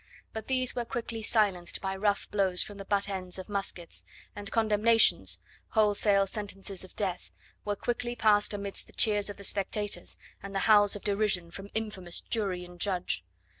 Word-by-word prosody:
But 220 -1 -6
these 255 -1 +2
were 240 - 0
quickly 230 -1 -4
silenced 200 -6 +1
by 190 0 -3
rough 205 +1 0
blows 190 -3 +3
from 205 -1 -10
the 195 - -7
butt 200 0 +1
ends 185 -2 -3
of 185 - -7
muskets, 195 -4 -3 0.3
and 205 0 -5
condemnations 210 - +4 0.3
wholesale 205 -2 +4
sentences 195 -1 -4
of 185 - -13
death 185 -4 -2 0.4
were 205 0 0
quickly 240 +3 -2
passed 210 -2 +3
amidst 200 -1 -2
the - - -18
cheers 210 -2 +2
of 205 - -7
the 200 - -10
spectators 205 +1 -1 0.2
and 200 0 -8
the - - +2
howls 205 -2 +6
of 205 - -7
derision 200 -4 0
from 195 +2 -9
infamous 195 -6 -3
jury 190 -6 -2
and 175 0 -14
judge. 180 - -1
205 Hz, 170 wpm, -29 LUFS, 190-215 Hz, 0.4 s, howls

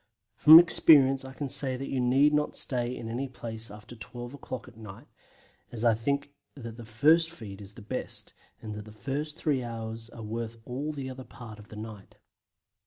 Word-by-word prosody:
From 155 +2 +10
experience 135 -6 +6
I 130 0 -9
can 140 +2 -4
say 130 -1 0
that 135 +1 -5
you 135 - -2
need 135 +4 +4
not 150 0 0
stay 125 -1 +1
in 115 - -7
any 125 +4 -3
place 115 -3 -6
after 105 +3 -12
12 120 +3 -9
o'clock 130 -3 -7
at - - -15
night, 105 -3 -11 0.7
as 120 0 -1
I 115 - +6
think 140 +6 -2 0.2
that 115 -5 -8
the 120 - -9
first 155 +9 +4
feed 105 -11 -10
is 100 0 -12
the 110 - -11
best, 105 - -3 0.3
and 110 -1 -5
that 105 0 -7
the 110 - -12
first 140 +9 -4
three 145 -6 0
hours 115 -1 -5
are 115 - -10
worth 115 +1 -5
all 140 +5 -3
the 140 -3 -6
other 130 0 -7
part 115 -4 -11
of 105 - -13
the 110 - -12
night. 105 -2 -9
120 Hz, 200 wpm, -28 LUFS, 110-135 Hz, 0.7 s, From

